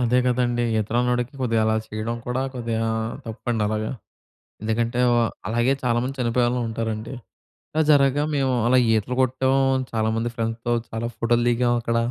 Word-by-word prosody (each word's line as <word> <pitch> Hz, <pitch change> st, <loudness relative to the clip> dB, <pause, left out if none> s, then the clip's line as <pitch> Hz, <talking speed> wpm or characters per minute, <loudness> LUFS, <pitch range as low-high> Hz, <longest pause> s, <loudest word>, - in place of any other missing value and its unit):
అదే 125 Hz, 0 st, +3 dB
కదండీ! 120 Hz, -1 st, +1 dB
ఈత 105 Hz, -1 st, -2 dB
రానోడికి 125 Hz, +1 st, +1 dB
కొద్దిగా 115 Hz, -3 st, +1 dB
అలా 110 Hz, 0 st, +2 dB
చేయడం 110 Hz, +2 st, -3 dB
కూడా 125 Hz, +1 st, -1 dB
కొద్దిగా 115 Hz, -2 st, -2 dB, 0.4 s
తప్పండలాగా. 110 Hz, -1 st, -2 dB, 0.7 s
ఎందుకంటే, 115 Hz, +2 st, -1 dB, 0.5 s
అలాగే 120 Hz, +4 st, +2 dB
చాలా 120 Hz, -1 st, +2 dB
మంది 135 Hz, +2 st, -4 dB
చనిపోయేన 120 Hz, 0 st, +2 dB
వాళ్ళుంటారండి. 115 Hz, 0 st, -3 dB, 0.6 s
ఇలా 160 Hz, -, +2 dB
జరగగా 140 Hz, 0 st, +4 dB
మేము 135 Hz, -2 st, +1 dB, 0.2 s
అలా 130 Hz, +1 st, +5 dB
ఈతలు 110 Hz, +3 st, 0 dB
కొట్టాం. 130 Hz, +1 st, +1 dB, 0.4 s
చాలా 110 Hz, -1 st, +1 dB
మంది 115 Hz, +1 st, -1 dB
ఫ్రెండ్స్‌తో 115 Hz, +1 st, -1 dB, 0.2 s
చాలా 115 Hz, +1 st, -3 dB
ఫోటోలు 120 Hz, +1 st, +1 dB
దిగాం 120 Hz, 0 st, +2 dB
అక్కడ. 115 Hz, 0 st, -1 dB
120 Hz, 145 wpm, -23 LUFS, 115-125 Hz, 0.7 s, అలా